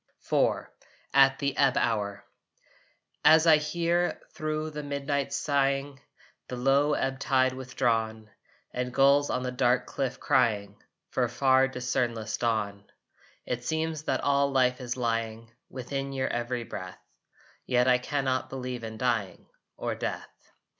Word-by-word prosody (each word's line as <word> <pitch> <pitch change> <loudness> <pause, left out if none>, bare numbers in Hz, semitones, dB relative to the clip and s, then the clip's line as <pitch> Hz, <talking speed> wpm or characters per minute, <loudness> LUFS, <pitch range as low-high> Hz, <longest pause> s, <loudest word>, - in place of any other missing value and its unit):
IV - - +1 0.5
AT 135 0 +6
THE 140 -1 -1
EBB 135 -2 +4
HOUR 105 -3 -1 1.0
As 160 +1 +7
I 160 -2 +7
hear, 170 +3 0
thro 155 0 -3
the 150 0 -5
midnight 140 -1 -2
sighing, 140 -1 0 0.5
The 125 - -5
low 135 +4 +3
ebb 135 0 -2
tide 130 -1 +2
withdrawn, 115 -4 -1 0.4
And 125 0 -2
gulls 140 +1 +5
on 125 - -1
the 125 - -2
dark 125 0 +2
cliff 130 -2 -3
crying 105 -5 +1 0.3
For - - +1
far 130 -1 +3
discernless 120 -4 -2
dawn, 105 -4 -1 0.6
It 125 0 -3
seems 160 +2 -2
that - - 0
all 140 0 +2
life 130 -1 +2
is 125 0 -4
lying 115 -1 -2 0.2
Within 135 +2 -4
your 130 -1 -1
every 120 0 -2
breath, 95 -4 -7 0.7
Yet 125 0 +3
I 125 -1 +5
can 140 +2 -2
not 130 0 0
believe 125 -2 -5
in 110 -1 -6
dying, 115 -5 -1 0.3
Or - - -2
death. - - -6
130 Hz, 140 wpm, -28 LUFS, 120-140 Hz, 1.0 s, As